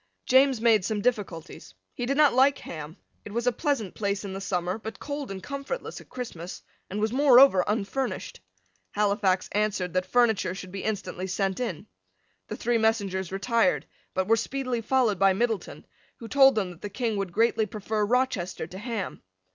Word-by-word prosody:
James 260 -1 +4
made 220 -3 +4
some 210 +2 -1
difficulties. 185 - -3 0.2
He 245 - -4
did 275 +2 0
not 300 -2 +5
like 270 +3 +4
Ham. 155 +2 -8 0.3
It 205 - -9
was 235 +1 -1
a 245 - +4
pleasant 250 - -1
place 200 -1 -2
in 195 - -5
the 195 - -5
summer, 180 +1 -2
but 220 +1 -7
cold 285 -1 -5
and 190 -1 -7
comfortless 280 - -5
at - - -18
Christmas, 190 -9 -7 0.3
and 200 - -3
was 215 +2 0
moreover 265 -7 +7
unfurnished. 225 - -2 0.5
Halifax 200 -2 +1
answered 200 -4 0
that 185 0 0
furniture 220 -4 +2
should 185 -1 -8
be 195 0 -6
instantly 195 -3 -3
sent 190 +1 -1
in. 230 -11 -3 0.6
The - - -5
three 235 0 +1
messengers 200 -5 0
retired, 230 +6 +1 0.3
but 190 0 0
were 225 +1 +4
speedily 255 -1 -2
followed 240 -3 +1
by 195 -1 +5
Middleton, 225 +1 -2 0.3
who 230 - -9
told 270 +1 +6
them 195 -4 -1
that 170 - -14
the 205 - -5
King 225 0 -2
would 195 -3 -2
greatly 225 +2 +2
prefer 210 +1 -2
Rochester 210 -7 0
to 185 +3 -9
Ham. 225 -3 -4
215 Hz, 180 wpm, -27 LUFS, 190-245 Hz, 0.6 s, moreover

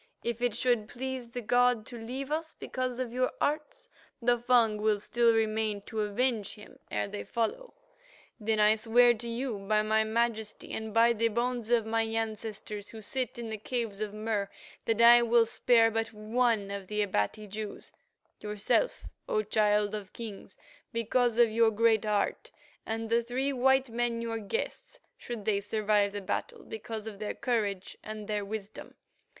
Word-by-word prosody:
If 235 0 -3
it 245 -3 +1
should 240 -3 +1
please 255 0 -5
the 245 +1 -5
god 245 0 +3
to 245 - -8
leave 260 +5 -5
us 320 +1 -3
because 255 -1 -3
of 250 -2 -3
your 255 0 +1
arts, 305 +12 -2 0.3
the 240 0 +2
Fung 235 -3 +3
will 215 -1 +3
still 235 +3 +3
remain 215 -2 0
to 220 0 -3
avenge 215 0 0
him 210 -1 -14
ere 105 -1 -1
they 100 - -6
follow. 235 - -3 0.6
Then 220 0 0
I 210 0 +6
swear 240 +2 +5
to 235 +1 -6
you 235 -2 -3
by 215 +2 +1
my 220 0 +3
majesty 220 -1 -1
and 220 0 -4
by 230 +2 +5
the 230 0 +1
bones 235 0 -1
of 235 -2 +3
my 225 +1 +1
ancestors 220 -2 -4
who 225 - -9
sit 250 +3 -3
in 230 -2 -5
the 215 - -4
caves 225 -3 -3
of 215 -1 -2
Mur, 210 -1 -2 0.4
that 225 0 +2
I 240 +1 +9
will 235 0 +4
spare 230 0 +4
but 225 0 -1
one 215 -1 0
of 200 -1 -5
the 210 +1 0
Abati 195 - -1
Jews, 210 +1 -7 0.5
yourself, 210 - 0 0.2
O 215 - +1
Child 210 0 +2
of 205 -3 -6
Kings, 220 -4 -8 0.3
because 235 0 +1
of 235 -2 +5
your 225 0 +4
great 220 0 +3
heart, 210 -1 0 0.4
and 225 0 -2
the 235 +1 +4
three 260 +4 -1
white 265 0 +3
men, 235 0 0
your 230 -1 -3
guests, 470 - -4 0.2
should 235 -4 -6
they 205 -2 +1
survive 205 -1 +1
the 205 0 -5
battle, 190 - -3
because 220 0 -6
of 210 -3 -7
their 215 - -3
courage 205 -6 -1
and 215 -1 -7
their 210 -1 -1
wisdom. 205 0 -7
225 Hz, 175 wpm, -30 LUFS, 210-240 Hz, 0.6 s, I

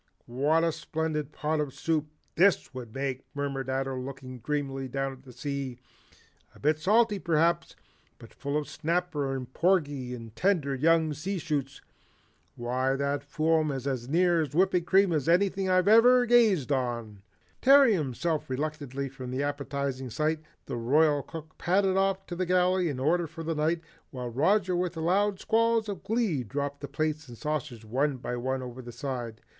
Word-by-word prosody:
What 145 +7 +1
a 165 - +2
splendid 155 -2 -3
pot 155 +1 -1
of 145 -3 -3
soup 155 -2 0 0.3
THIS 175 -8 +3
would 125 -3 -7
make," 135 +1 -3
murmured 140 -2 -3
Ato 135 0 -1
looking 130 -1 -7
dreamily 135 +1 -2
down 135 +1 -2
at 130 - -14
the 130 -1 -14
sea, 135 0 -4 0.8
"a - - -16
bit 155 +2 +1
salty, 210 +4 +3
perhaps, 170 0 +1 0.4
but - - -14
full 140 +1 -2
of 150 - -3
snapper 160 -4 -1
and 130 -1 -6
porgy 145 -9 +1
and 115 -2 -10
tender 165 - +1
young 160 +3 +3
sea 185 +7 -3
shoots. 145 -5 -3 0.7
Why 130 +3 0
that 140 +1 -1
foam's 155 -2 0
as 130 -3 -3
near 170 +1 +3
to 145 - -7
whipping 180 -2 +3
cream 190 -1 +4
as 155 0 0
anything 190 +2 +2
I've 185 0 +3
ever 245 +3 +7
gazed 220 - +4
on." 120 -6 -2 0.4
Tearing 270 -3 +7
himself 155 - -1
reluctantly 140 -1 -3
from 130 -1 -8
the 130 +3 -2
appetizing 140 -2 -3
sight, 155 +6 0 0.3
the - - -4
Royal 145 +5 +3
Cook 155 +1 -10
padded 190 +1 +2
off 195 0 +1
to - - -7
put - - -10
the 185 - 0
galley 180 0 +3
in 135 -3 -4
order 165 +5 +1
for 165 +1 -8
the 165 +1 -1
night, 160 +2 0 0.3
while 125 -2 -5
Roger 180 - +2
with 175 -1 -1
loud 190 +4 +1
squalls 230 0 +2
of 200 -4 -5
glee 205 - 0
dropped 140 +4 -4
the 140 - -5
plates 155 +1 -2
and 120 -1 -11
saucers 135 -7 -4
one 135 +5 0
by 125 0 -4
one 130 +2 -2
over 125 0 -7
the 120 -1 -9
side. 120 -3 -5
150 Hz, 170 wpm, -28 LUFS, 135-175 Hz, 0.8 s, ever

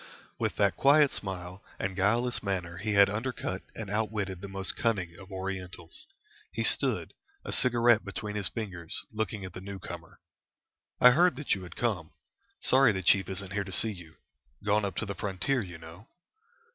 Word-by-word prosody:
With - - -1
that - - +2
quiet 145 +1 +6
smile 90 -1 -6
and 95 0 -3
guileless 115 +6 +1
manner 90 -4 -3
he 105 +2 -2
had 100 0 +7
undercut 105 -3 -3
and 110 - -5
outwitted 105 -3 -2
the 100 - -6
most 95 0 -3
cunning 95 -7 -1
of 100 0 -13
Orientals. 95 - -6 0.4
He - - -2
stood, - - +3 0.3
a - - -4
cigarette 120 -3 +4
between 105 +1 -5
his 105 -2 -1
fingers, 90 -8 -5
looking 105 -2 -3
at 95 - -8
the 90 - -8
newcomer. 95 -1 -8 0.8
"I 125 - +9
heard 175 +3 +4
that 145 +2 0
you 95 - -2
had 90 -2 -10
come. 100 -10 -2 0.5
Sorry 130 -2 +5
the 95 -2 -3
chief 95 +3 +4
isn't 95 0 -4
here 100 -1 0
to 95 - -9
see 110 +3 +2
you. 85 -5 -11 0.5
Gone 105 0 +3
up 95 -3 -4
to - - -2
the 100 - -4
frontier, 100 +7 -1
you 90 -5 -8
know." 80 +6 -13
100 Hz, 175 wpm, -29 LUFS, 95-110 Hz, 0.8 s, I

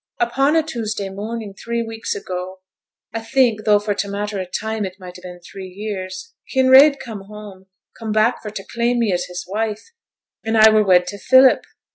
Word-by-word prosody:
'Upon 270 +5 +2
a 320 - +3
Tuesday 220 -9 -4
morning, 210 +1 -6
three 235 +3 -3
weeks 225 0 -5
ago, 185 -1 -6 0.5
I 225 - -3
think, 225 -2 +1
tho' 210 -1 +5
for 205 0 -2
t' 200 - -3
matter 205 0 -4
o' 185 - -3
time 220 +4 -3
it 190 0 -6
might 180 -1 -10
ha' - - -15
been 180 -1 -10
three 190 +2 -10
years, 195 - -7 0.2
Kinraid 265 +2 +6
come 215 -5 -8
home; 205 -2 -12 0.3
come 225 -2 -4
back 215 +3 +2
for 210 - -6
t' 200 -2 -7
claim 235 +3 -1
me 225 -5 +1
as 175 0 -1
his 180 0 -7
wife, 215 - -4 0.5
and 225 0 0
I 220 0 +8
were 215 0 +4
wed 180 -3 +4
to 205 +2 -7
Philip! 260 +2 +5
215 Hz, 195 wpm, -20 LUFS, 195-235 Hz, 0.5 s, I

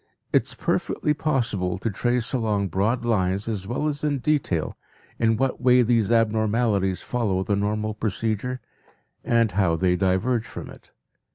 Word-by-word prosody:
It - - +3
is - - -2
perfectly 150 - 0
possible 115 - -1
to 110 +4 -2
trace 120 +5 0
along 105 -5 0
broad 110 +7 0
lines 100 -3 0
as 100 -4 -3
well 130 +7 -1
as 145 -1 -3
in 145 -2 +1
detail 130 - -1 0.4
in 115 -1 +2
what 135 +1 -1
way 125 0 +5
these 115 -2 +2
abnormalities 110 -3 +1
follow 105 -7 -1
the 100 - 0
normal 105 +1 -1
procedure 110 +4 -2 0.6
and 115 -2 +2
how 95 -4 +2
they 90 +2 +2
diverge 100 +6 0
from 100 - -8
it. - - -16
110 Hz, 155 wpm, -24 LUFS, 100-120 Hz, 0.6 s, way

